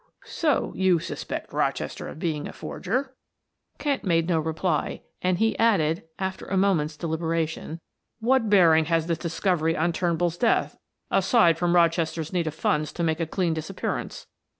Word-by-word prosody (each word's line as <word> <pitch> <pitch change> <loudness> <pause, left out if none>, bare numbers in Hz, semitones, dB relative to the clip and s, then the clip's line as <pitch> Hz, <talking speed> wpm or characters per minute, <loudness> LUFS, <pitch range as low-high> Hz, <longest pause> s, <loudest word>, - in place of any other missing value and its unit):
"So 305 -4 0
you 190 -2 +3
suspect 160 - -5
Rochester - - -2
of - - -8
being 155 -3 -2
a - - -9
forger?" 260 +7 -3 0.6
Kent 285 -3 -1
made 165 -3 +2
no 170 -3 +2
reply, 160 0 -1 0.2
and 180 -1 +1
he 225 +3 +2
added; 175 -8 +3 0.2
after 190 -1 -4
a 195 - -1
moment's 165 -6 +1
deliberation, 160 0 -2 0.4
"What 235 -1 +2
bearing 165 -6 +5
has 165 0 +1
this 170 -1 -1
discovery 165 -1 0
on 170 +2 +1
Turnbull's 170 0 0
death, 235 - +2 0.4
aside 170 - +4
from 175 0 +2
Rochester's 165 -1 +1
need 170 -3 0
of 155 - -3
funds 150 -1 0
to 170 - -3
make 160 0 0
a 165 - -1
clean 175 0 0
disappearance?" 160 -1 -4
170 Hz, 155 wpm, -25 LUFS, 160-190 Hz, 0.6 s, bearing